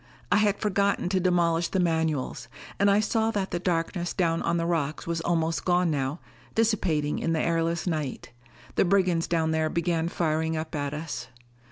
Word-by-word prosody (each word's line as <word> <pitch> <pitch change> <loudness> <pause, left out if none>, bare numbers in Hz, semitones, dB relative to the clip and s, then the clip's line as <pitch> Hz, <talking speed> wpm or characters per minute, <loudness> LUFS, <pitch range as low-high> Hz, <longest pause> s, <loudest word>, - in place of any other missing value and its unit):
I - - +5
had 205 -1 +3
forgotten 200 -3 +1
to 190 0 +1
demolish 170 -2 +2
the 190 - -1
manuals. 160 -5 0 0.3
And 200 +1 +4
I 200 +1 +4
saw 220 +1 +1
that 200 -4 -2
the 175 - -1
darkness 175 0 -1
down 165 -3 +1
on 170 0 0
the 165 - 0
rocks 155 -3 -1
was 165 0 -2
almost 165 -1 0
gone 175 -1 +2
now, 140 +2 -1 0.4
dissipating 185 -10 +1
in 165 - 0
the 160 - +1
airless 165 0 0
night. 155 -6 -3 0.5
The - - +5
brigands 180 -3 +2
down 160 -2 +1
there 160 0 +1
began 170 0 0
firing 160 -1 0
up 160 +1 -5
at 145 -1 -2
us. 145 -5 -5
170 Hz, 180 wpm, -27 LUFS, 160-185 Hz, 0.5 s, I